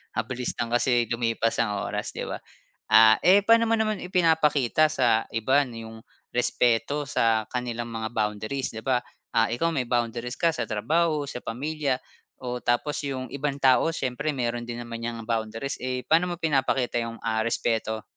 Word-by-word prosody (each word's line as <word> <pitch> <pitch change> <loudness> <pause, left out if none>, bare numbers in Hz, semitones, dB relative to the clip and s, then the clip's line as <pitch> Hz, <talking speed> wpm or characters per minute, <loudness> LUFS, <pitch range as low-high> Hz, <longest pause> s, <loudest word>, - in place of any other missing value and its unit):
Mabilis 120 +3 -3
lang 115 - -2
kasi 120 -1 +2
lumipas 115 -1 0
ang 105 -3 0
oras, - - -4
'di - - -4
ba? - - -3 0.5
Ah, 110 0 +8
eh, 195 +3 +6
paano 230 0 +6
mo 230 - +3
naman 215 -2 0
ipinapakita 155 -5 +3
sa 120 -7 +2
iba 130 +6 +3
'yong 115 -1 -9 0.3
respeto 125 +3 +1
sa 115 -5 +2
kanilang 120 -1 -3
mga 110 -1 -3
boundaries, 110 +4 -2
'di 110 - -5
ba? 130 -1 +2 0.4
Ah, 115 0 +3
ikaw 165 +7 0
may 135 -6 -1
boundaries 120 +1 -1
ka 170 - +4
sa 160 - -3
trabaho, 150 +7 +1
sa - - -5
pamilya, 140 +2 -2 0.4
o 125 0 -3
tapos 120 +5 0
'yong 130 -2 -4
ibang 140 0 -2
tao 135 +5 +4
siyempre 145 +3 -2
meron 120 -2 -2
din 120 0 -5
naman 115 -1 -7
'yang 115 -1 -4
boundaries, 115 +3 -2
eh, 125 0 -3
paano 175 +2 +2
mo - - -9
pinapakita 135 -5 +1
'yong, 115 0 -4
ah, 110 -1 0
respeto? 110 -1 -1
125 Hz, 170 wpm, -26 LUFS, 115-145 Hz, 0.5 s, Ah